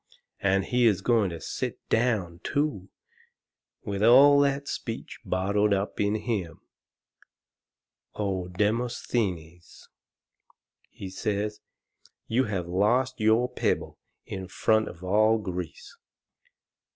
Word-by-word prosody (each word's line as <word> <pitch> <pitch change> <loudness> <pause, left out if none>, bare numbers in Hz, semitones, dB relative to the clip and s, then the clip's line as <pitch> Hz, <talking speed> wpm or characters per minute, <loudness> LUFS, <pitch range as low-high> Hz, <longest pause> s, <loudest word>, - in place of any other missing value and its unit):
And 95 0 +1
he 125 -1 +3
is 100 -4 +2
going 115 -4 +3
to 85 -1 -7
sit - - -4
down, 105 -8 0
too, 140 -11 -1 0.9
with 100 -1 -4
all 140 +5 +7
that 140 0 +1
speech - - -6
bottled 100 +2 +1
up 100 +1 -3
in 105 +1 +1
him! 105 -7 -3 1.6
O 95 -4 -2
Demosthenes!" 95 -4 -2 1.0
he 95 -1 -9
says, 105 +2 -2 0.7
"you 125 +4 +1
have 95 -5 -3
lost 105 +10 +1
your 110 +3 +3
pebble - - -2 0.3
in 95 -1 -6
front 110 +3 +1
of 85 - -10
all 110 +4 +3
Greece." 90 -5 -6
105 Hz, 105 wpm, -27 LUFS, 95-115 Hz, 1.6 s, all